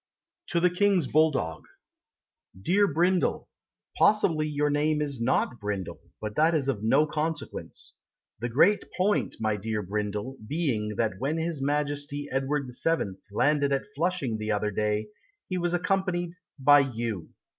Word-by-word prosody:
TO 170 - +1
THE 180 +1 +3
KING'S 190 -2 +2
BULLDOG 135 - +1 1.0
Dear 195 - +2
Brindle, 175 +4 +1 0.5
Possibly 165 -7 +3
your 150 0 0
name 150 +1 +1
is 140 -5 -3
not 120 0 +1
Brindle, 100 -3 -4 0.2
But 105 -1 -4
that 160 +2 +4
is 140 -4 0
of 125 -7 -1
no 135 +7 +4
consequence; 155 0 -5 0.4
The 120 +2 -2
great 170 - +4
point, 195 +3 +1
my 110 -1 0
dear 105 +1 -3
Brindle, 105 +5 -3
being 115 -9 -1
That 105 -4 -1
when 140 +6 -1
his 165 -3 -2
Majesty 145 0 -2
Edward 135 +1 -1 0.2
VII. 105 - 0
Landed 140 +5 +2
at 140 0 -2
Flushing 160 -8 -1
the 110 0 -2
other 105 0 0
day 105 +1 0 0.4
He 185 -1 -2
was 175 0 0
accompanied 180 -1 0 0.3
By 145 +1 +7
You. 115 - -2
145 Hz, 145 wpm, -27 LUFS, 110-165 Hz, 1.0 s, By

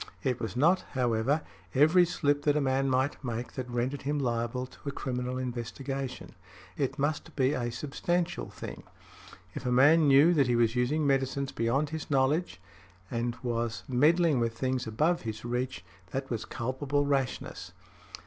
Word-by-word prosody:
It 125 -3 0
was 115 -1 -4
not, 170 +8 +4
however, 125 +3 +1 0.3
every 160 +6 +6
slip 145 -4 +1
that 150 0 +3
a - - +3
man 135 -1 +1
might 130 +3 0
make 120 -1 -4
that 125 -2 -5
rendered 125 +3 -2
him 145 +2 -1
liable 120 -1 -1
to 135 +3 -8
a - - -3
criminal 125 -2 -3
investigation. 130 +2 -5 0.4
It 135 0 -1
must 145 +1 -2
be 135 0 +2
a 120 -3 -2
substantial 170 +7 -2
thing. - - -8 0.7
If - - -6
a 125 - -1
man 145 +5 +6
knew 140 +5 +6
that 140 -6 +3
he 120 - +2
was 115 0 +2
using 140 +5 +1
medicines 135 0 0
beyond 135 +6 0
his 160 0 -5
knowledge 140 - +1 0.5
and 120 0 -2
was 115 -2 -2
meddling 150 +3 +3
with 115 -1 -1
things 130 -2 -1
above 155 +11 +1
his 110 0 -6
reach, 120 -7 -3 0.2
that 135 +5 -4
was 110 -2 -2
culpable 135 +5 -1
rashness. 135 -3 -2
130 Hz, 160 wpm, -29 LUFS, 120-145 Hz, 0.7 s, every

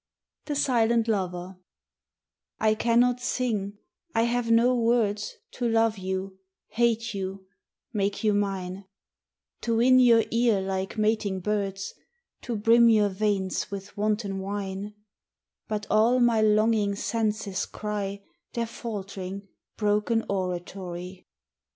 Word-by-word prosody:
80 - - -4
THE - - 0
SILENT 235 -3 +2
LOVER 185 -3 -2 1.0
I 215 0 +3
CANNOT 240 +2 +2
sing, 215 -6 -2 0.4
I 225 - +4
have 235 0 0
no 230 +2 +5
words 225 -4 +1 0.2
To 240 -2 -2
love 225 -2 +2
you, 190 0 -4 0.3
hate 230 -1 +1
you, 190 0 -5 0.5
make 200 0 -1
you 215 -1 +3
mine 195 -1 -2 0.8
To 230 -1 0
win 255 +2 +6
your 235 -3 +6
ear 230 -3 +3
like 190 +1 -3
mating 215 -3 0
birds, 195 -1 -2 0.5
To 240 - -4
brim 230 +2 +5
your 210 -2 +4
veins 195 -1 -1
with 195 0 -7
wanton 210 -1 -1
wine; 200 +1 -4 0.7
But 215 -2 -3
all 225 +4 +4
my 235 -2 +4
longing 215 -1 +3
senses 210 -3 -1
cry 200 -2 -4 0.3
Their 235 -1 -1
faltering, 200 -4 -6 0.3
broken 210 +2 +1
oratory. 180 -1 -4
210 Hz, 120 wpm, -26 LUFS, 195-230 Hz, 1.0 s, win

